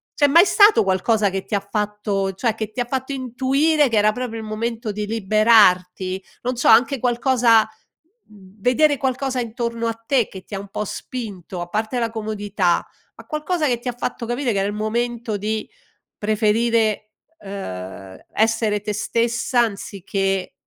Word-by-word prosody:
C'è 290 - +4
mai 335 +7 +6
stato 410 +3 +6
qualcosa 200 +3 +2
che 190 0 -4
ti - - -8
ha 200 - 0
fatto 205 -2 -1
cioè 225 +4 0
che 215 -1 -4
ti 230 - -7
ha - - -1
fatto 260 +2 -3
intuire 270 +4 +1
che 225 - +1
era 210 +1 +4
proprio 235 -1 -5
il 220 - -8
momento 230 +1 -3
di 210 0 -4
liberarti? 195 -4 +3 0.2
Non 250 +1 -2
so, - - 0
anche 255 +4 +5
qualcosa, 240 -2 +3 0.6
v 200 -1 -19
vedere 285 +4 +3
qualcosa 265 0 -1
intorno 235 0 -3
a 225 - 0
te 255 -5 +2
che 190 -1 -11
ti 200 - -8
ha - - -3
un 200 - -9
po' 210 - -3
spinto, 195 -7 -6
a 175 - -5
parte 220 +5 -2
la 230 -1 0
comodità, 205 -5 -1 0.3
ma - - -14
qualcosa 305 +2 -1
che 245 -2 0
ti 245 - -9
ha 245 - -1
fatto 245 -1 -4
capire 240 +2 -1
che 200 - 0
era 195 - 0
il 205 - -3
momento 230 0 -2
di 215 +2 -3 0.5
preferire, 215 0 +1 0.3
ehm, 95 - -8
essere 220 -2 +1
te 210 - -3
stessa 235 +3 0
anziché, 195 -3 -2
220 Hz, 170 wpm, -21 LUFS, 200-245 Hz, 0.6 s, mai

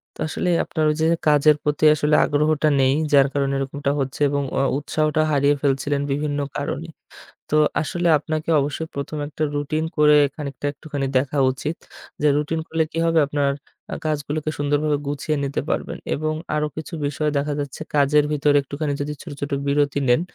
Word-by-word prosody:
তো - - -22
আসলে 180 +3 -2
আপনার 155 -3 -2
ওই 150 - +1
যে - - +3 0.2
কাজের 150 0 +5
প্রতি 150 0 -1
আসলে 150 0 +2
আগ্রহটা 150 +1 +1
নেই 130 0 +4 0.2
যার 140 -1 +6
কারণে 140 -1 0
এরকমটা 140 +1 -2
হচ্ছে। 135 +1 -3
এবং 140 0 0
অ - - +2 0.2
উৎসাহটা 155 +1 0
হারিয়ে 145 0 +3
ফেলছিলেন 140 +1 0
বিভিন্ন 145 +1 -1 0.2
কারণে। 145 +3 -3 0.6
তো - - +1 0.3
আসলে 175 +2 -1
আপনাকে 155 +2 -4
অবশ্যই 150 +3 -2
১ম 140 +2 -4
এ - - -2
একটা 150 +1 -4
রুটিন 145 +2 -1
করে 150 0 +6 0.2
খানিকটা 145 -1 -6
একটুখানি 145 -1 -4
দেখা 140 +2 -1
উচিত। 150 +5 -4 0.4
যে 150 - +4
রুটিন 155 +2 -1
করলে 160 0 +1
কি 165 - -6
হবে 165 -1 +3
আপনার 145 -1 +1 0.4
আ - - -2
কাজগুলোকে 150 0 -2
সুন্দরভাবে 145 +1 +1
গুছিয়ে 145 +2 -2
নিতে 140 0 -2
পারবেন। - - -2 0.2
এবং 155 +1 -2 0.2
আরো 150 0 0
কিছু 155 +3 -7
বিষয় 150 +1 -1
দেখা 145 +1 -1
যাচ্ছে 145 +1 -5
কাজের 145 +1 +4
ভিতরে 145 -1 +2
একটুখানি 145 +2 -3
যদি 145 +1 -3
ছোট, 170 - -9
ছোট 145 - -3 0.2
বিরতি 145 0 +1
নেন, 120 +6 +4
145 Hz, 175 wpm, -22 LUFS, 140-155 Hz, 0.6 s, যার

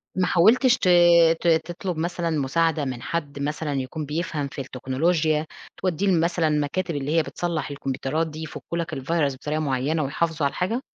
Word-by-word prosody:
ما 185 -1 +1
حاولتش 240 +10 +5
ت - - -1 0.5
ت - - -1
ت 165 +1 +2
تطلب 180 -1 -4
مثلًا 170 +1 -2
مساعدة 155 +1 +1
من 125 -3 -4
حد 145 -3 -4
مثلًا 150 +1 -2
يكون 140 +3 -3
بيفهم 150 -1 -3
في 140 - -6
التكنولوجيا، 150 +5 0 0.3
توديّه 185 +1 -1
لمثلًا 170 -2 +2
مكاتب 150 +4 -1
اللي 140 +1 -2
هي 165 - +4
بتصلّح 170 0 -3
الكمبيوترات 140 +3 -2
دي 155 0 -7
يفكّوا 155 +1 -6
لك 170 -1 -3
الvirus 145 +1 0
بطريقة 150 +4 -3
معيّنة 145 +2 0
ويحافظوا 155 +2 -1
على 140 - +1
الحاجة؟ 225 +8 -2
155 Hz, 170 wpm, -24 LUFS, 140-170 Hz, 0.5 s, حاولتش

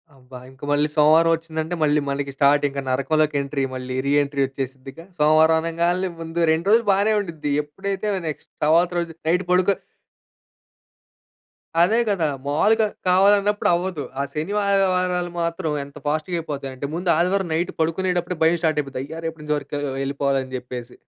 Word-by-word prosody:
అబ్బా! 125 -1 -12
ఇంక 130 +1 -19
మళ్ళీ 145 +1 +3
సోమవారం 160 +2 +5
ఒచ్చిందంటే 160 +1 -4
మళ్ళీ 150 0 +3
మనకి 140 0 -2
స్టార్ట్ 145 +1 +3
ఇంకా 140 0 -4
నరకంలోకి 150 +3 +1
ఎంట్రీ. 140 0 -2
మళ్ళి 130 0 -5
రీ 140 - +1
ఎంట్రీ 140 -1 -2
ఒచ్చేసిద్దిగా. 135 +3 -7
సోమవారం 155 +2 +5
అనంగాల్నే 170 +3 0
ముందు 165 +1 -5
2 165 +4 0
రోజులు 225 +1 +4
బానే 205 +3 +2
ఉండుద్ది. 160 -7 -4
ఎప్పుడైతే 195 +7 -4 0.2
నెక్స్ట్ 150 - -6
తరువాత 165 +3 +4
రోజు 170 -1 -3 0.2
నైట్ 180 +3 +2
పడుకొ 185 +2 +3 2.1
అదే 215 +7 +4
గదా! 195 -6 +1 0.2
మాములుగా 215 +10 +3 0.2
కావాలన్నప్పుడు 200 +3 +3
అవ్వదు. 175 -4 -3 0.2
ఆ - - 0
శని 160 +7 -3
వా 210 - +1
ఆదివారాలు 180 -2 +1
మాత్రం 170 -1 -2
ఎంత 140 +1 -14
ఫాస్ట్‌గా 155 +4 -1
అయిపోతాయంటే, 140 -3 -5
ముందు 180 0 -2
ఆదివారం 180 +2 +1
నైట్ 170 +3 -1
పడుకునేటప్పుడే 175 +2 0
భయం 165 +2 +4
స్టార్ట్ 155 -2 +1
అయిపోద్ది. 135 -2 -7
అయ్యా! 160 +4 -8
రేపన్నుంచి 150 -2 -2
వర్క్ 145 0 -7 0.3
ఎళ్ళిపోవాలి 140 -1 -1
జేప్పేసి. 125 -1 -6
160 Hz, 150 wpm, -22 LUFS, 140-180 Hz, 2.1 s, సోమవారం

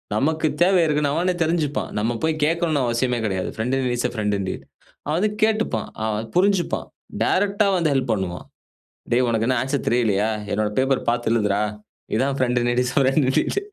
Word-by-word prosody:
நமக்கு 155 +7 +1
தேவை 185 0 +5
இருக்குன்னு 150 -2 +1
அவனே 180 +4 +1
தெரிஞ்சிப்பான். 160 -3 -1
நம்ம 115 +3 0
போய் 160 -1 0
கேட்கணுனு 165 -2 +1
அவசியமே 120 +1 0
கிடையாது. 95 -3 -2
Friend 120 +4 -1
in 135 - -1
need 125 -1 0
is 120 - 0
a - - -11
friend 105 -2 0
in 95 - -3
டீட் - - -6 0.5
அது 175 +6 +1 0.2
கேட்டுப்பான். 220 0 +1 0.2
அவன் 110 0 -2
புரிஞ்சிப்பான். 190 0 +1 0.4
டைரக்ட்டா 200 +1 +2
வந்து 165 -4 +1
ஹெல்ப் 130 -3 0
பண்ணுவான். 95 -4 -4 0.7
டேய்! 125 +1 +4
உனக்கு 115 -1 0
என்ன 130 -1 +2
ஆன்ஸர் 135 +1 -2
தெரியலயா? 110 -3 +2 0.2
என்னுடைய 105 0 0
பேப்பர் 135 0 0
பார்த்து 120 -1 0
எழுதுடா! 105 -2 +1 0.5
இதுதான் 135 +4 +1
friend 125 -1 +1
in 120 - 0
need 120 +1 +2
is 125 - -3
a - - +3
friend 135 +3 +3
in 130 - +1
deed - - 0
130 Hz, 190 wpm, -22 LUFS, 115-160 Hz, 0.7 s, தேவை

